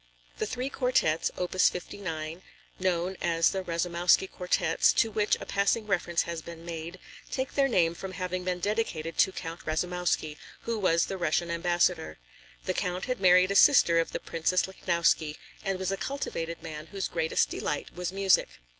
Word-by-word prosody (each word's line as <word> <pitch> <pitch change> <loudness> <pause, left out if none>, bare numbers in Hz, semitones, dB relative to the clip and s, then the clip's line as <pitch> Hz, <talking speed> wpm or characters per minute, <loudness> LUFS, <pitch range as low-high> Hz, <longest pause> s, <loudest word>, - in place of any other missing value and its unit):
The - - -1
three 255 +2 -3
quartets, 250 - +1
opus 180 +1 +3
59, 165 -3 -6 0.4
known 185 0 0
as 165 -1 +2
the 190 - -2
Rasoumowsky 175 +1 +1
Quartets, 180 0 +2
to 225 - +2
which 210 0 +2
a - - -7
passing 200 +3 +1
reference 175 -4 0
has 170 -1 -5
been 170 0 -10
made, 170 +1 -6 0.3
take 260 0 -3
their 275 -1 +3
name 170 -9 +2
from 185 +2 -7
having 180 0 -3
been 180 -1 -2
dedicated 175 -5 -2
to 190 - +5
Count 165 -2 -7
Rasoumowsky, 165 -2 -1 0.2
who 230 -1 -3
was 170 -4 +3
the 195 - -5
Russian 170 0 0
ambassador. 175 0 0 0.5
The - - 0
Count 180 +1 -2
had 250 -6 -3
married 185 0 +6
a - - -1
sister 185 - +6
of 165 - -1
the - - -3
Princess 165 +2 0
Lichnowsky 170 -4 +1 0.3
and 195 -2 -1
was 190 0 -2
a 195 - -1
cultivated 170 - -4
man 155 -1 -7
whose 195 +2 -3
greatest 165 -1 0
delight 150 - -3
was 180 0 -4
music. 195 - +3
180 Hz, 170 wpm, -28 LUFS, 165-190 Hz, 0.5 s, married